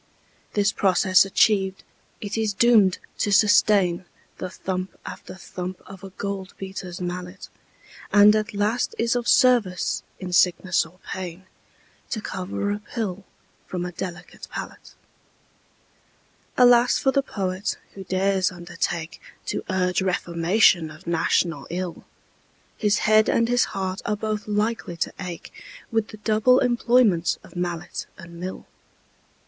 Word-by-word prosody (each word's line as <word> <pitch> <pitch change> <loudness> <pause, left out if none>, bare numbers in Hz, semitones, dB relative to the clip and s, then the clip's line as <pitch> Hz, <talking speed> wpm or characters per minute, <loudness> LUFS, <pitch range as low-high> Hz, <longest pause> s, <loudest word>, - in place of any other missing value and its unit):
This 205 -1 +2
process 185 -1 +4
achiev'd, 195 -1 +2 0.4
it 205 -1 -4
is 220 -2 -1
doom'd 210 -4 +5 0.2
to 205 - 0
sustain 200 -3 +4 0.3
The 185 - -4
thump 185 0 -5
after - - -8
thump 185 -1 -7
of 190 0 -12
a 195 - -7
gold 195 0 -5
beater's 190 -1 -7
mallet, 180 +1 -6 0.6
And 205 +1 +7
at 215 0 -2
last 210 +4 0
is 230 +1 +1
of 240 -1 -2
service 240 -9 +3 0.2
in 180 -1 -6
sickness 180 -1 +3
or 170 +3 -21 0.2
pain 185 0 -7 0.6
To 225 - -2
cover 195 0 -3
a 205 - -2
pill 205 -3 -5 0.4
from 180 -1 -3
a 180 - -5
delicate 175 0 -8
palate. - - -8 1.6
Alas 245 -1 +6
for 270 - +2
the 275 - +2
Poet, 195 -6 -3 0.2
who 195 - -8
dares 190 0 +1
undertake 170 -1 -4 0.2
To - - -3
urge 180 -1 +1
reformation 175 -1 +2
of 155 +4 -14
national 165 -2 0
ill! 180 0 -5 0.7
His 210 -2 +1
head 215 0 +5
and 230 - +2
his 245 0 +3
heart 190 -1 -4
are 210 - -1
both 215 0 -3
likely 210 -4 -1
to - - -2
ache 180 -3 -7 0.4
With 225 -2 +1
the 215 - -11
double 220 +4 +3
employment 240 -8 +3
of - - -16
mallet 175 -1 -4
and 170 -1 -11
mill. 185 +1 -6
190 Hz, 135 wpm, -24 LUFS, 180-215 Hz, 1.6 s, And